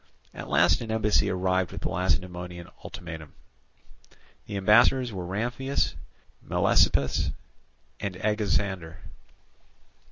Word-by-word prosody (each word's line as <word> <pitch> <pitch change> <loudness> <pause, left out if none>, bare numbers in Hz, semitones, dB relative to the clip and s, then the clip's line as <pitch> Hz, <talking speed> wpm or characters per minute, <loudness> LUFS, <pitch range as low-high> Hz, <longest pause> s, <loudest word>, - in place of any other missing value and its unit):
At - - -8
last 80 - +4
an 115 - -6
embassy 105 -2 +2
arrived 95 -1 0
with - - -7
the - - -2
Lacedaemonian 90 0 -2 0.2
ultimatum. 80 -3 -8 1.1
The 100 - -4
ambassadors 120 +5 +4
were 90 -2 -5
Ramphias, 120 +8 -1 0.5
Melesippus, 70 -1 +2 0.7
and 100 -2 -4
Agesander. 95 -4 -1
95 Hz, 95 wpm, -27 LUFS, 85-105 Hz, 1.1 s, last